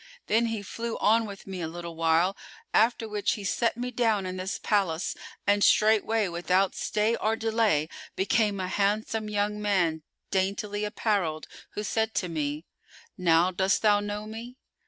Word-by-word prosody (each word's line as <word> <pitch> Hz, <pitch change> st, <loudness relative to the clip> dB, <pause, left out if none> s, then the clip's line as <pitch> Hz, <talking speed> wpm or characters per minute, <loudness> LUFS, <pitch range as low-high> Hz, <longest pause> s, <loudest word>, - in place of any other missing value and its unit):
Then 230 Hz, +2 st, +2 dB
he 225 Hz, -3 st, -3 dB
flew 230 Hz, +3 st, -4 dB
on 225 Hz, +1 st, +3 dB
with 200 Hz, -1 st, -9 dB
me 190 Hz, -2 st, -6 dB
a 160 Hz, -, -2 dB
little 170 Hz, 0 st, -7 dB
while, 165 Hz, +4 st, +2 dB, 0.4 s
after 225 Hz, 0 st, +3 dB
which 210 Hz, -1 st, 0 dB
he 205 Hz, -, -6 dB
set 230 Hz, +4 st, 0 dB
me 250 Hz, +1 st, -3 dB
down 225 Hz, -5 st, +1 dB
in 185 Hz, 0 st, -4 dB
this 185 Hz, +1 st, -3 dB
palace 190 Hz, -5 st, 0 dB, 0.3 s
and 205 Hz, 0 st, +3 dB
straightway 220 Hz, 0 st, +4 dB
without 180 Hz, +2 st, +1 dB
stay 215 Hz, +2 st, 0 dB
or 220 Hz, +1 st, +1 dB
delay 220 Hz, -9 st, +1 dB, 0.3 s
became 205 Hz, +1 st, +1 dB
a 185 Hz, -, -2 dB
handsome 210 Hz, +3 st, 0 dB
young 210 Hz, 0 st, -1 dB
man 175 Hz, -6 st, +1 dB, 0.3 s
daintily 200 Hz, +2 st, -1 dB
apparelled, 200 Hz, -7 st, -1 dB, 0.3 s
who 210 Hz, -, -2 dB
said 220 Hz, +1 st, -1 dB
to 180 Hz, -, 0 dB
me, 150 Hz, -1 st, -3 dB, 0.5 s
'Now 175 Hz, 0 st, +3 dB
dost 190 Hz, +3 st, +1 dB
thou 205 Hz, -1 st, +5 dB
know 205 Hz, +1 st, -4 dB
me? 230 Hz, +4 st, -8 dB
205 Hz, 160 wpm, -27 LUFS, 185-220 Hz, 0.5 s, thou